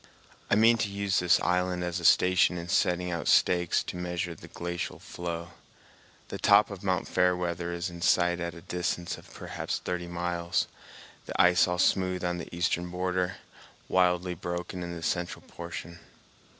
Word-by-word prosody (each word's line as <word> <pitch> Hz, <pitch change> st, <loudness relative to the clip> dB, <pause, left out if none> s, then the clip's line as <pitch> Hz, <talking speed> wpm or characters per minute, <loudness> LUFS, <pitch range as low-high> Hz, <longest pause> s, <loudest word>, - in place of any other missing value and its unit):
I -, -, +4 dB
mean 115 Hz, +2 st, +5 dB
to 105 Hz, -, 0 dB
use 100 Hz, -1 st, 0 dB
this 90 Hz, 0 st, +4 dB
island 90 Hz, 0 st, 0 dB
as 85 Hz, 0 st, -2 dB
a 85 Hz, -, -5 dB
station 90 Hz, 0 st, +5 dB
in 85 Hz, 0 st, -6 dB
setting 90 Hz, 0 st, +1 dB
out 85 Hz, -, -3 dB
stakes 90 Hz, -2 st, +3 dB
to -, -, -6 dB
measure 90 Hz, -1 st, -3 dB
the 80 Hz, -, -13 dB
glacial 85 Hz, 0 st, -4 dB
flow. 85 Hz, -1 st, -6 dB, 0.8 s
The -, -, -5 dB
top -, -, +5 dB
of -, -, -8 dB
Mt. -, -, 0 dB
Fairweather 90 Hz, -1 st, 0 dB
is 85 Hz, +1 st, -3 dB
in 85 Hz, 0 st, -9 dB
sight 85 Hz, -1 st, +3 dB
at 85 Hz, -1 st, -4 dB
a 85 Hz, -, -10 dB
distance 90 Hz, -1 st, -3 dB
of -, -, -17 dB
perhaps -, -, -4 dB
thirty 90 Hz, -1 st, -4 dB
miles, 85 Hz, 0 st, -1 dB, 0.6 s
the -, -, -5 dB
ice 90 Hz, +1 st, +6 dB
all 90 Hz, 0 st, -1 dB
smooth 90 Hz, 0 st, +2 dB
on 90 Hz, 0 st, -1 dB
the 85 Hz, -, -7 dB
eastern 85 Hz, 0 st, -1 dB
border, 90 Hz, 0 st, -1 dB, 0.5 s
wildly 90 Hz, 0 st, +2 dB
broken 90 Hz, +1 st, -5 dB
in 85 Hz, 0 st, -5 dB
the 85 Hz, -, -7 dB
central 90 Hz, +1 st, -2 dB
portion. 85 Hz, +1 st, -8 dB
90 Hz, 170 wpm, -28 LUFS, 85-90 Hz, 0.8 s, ice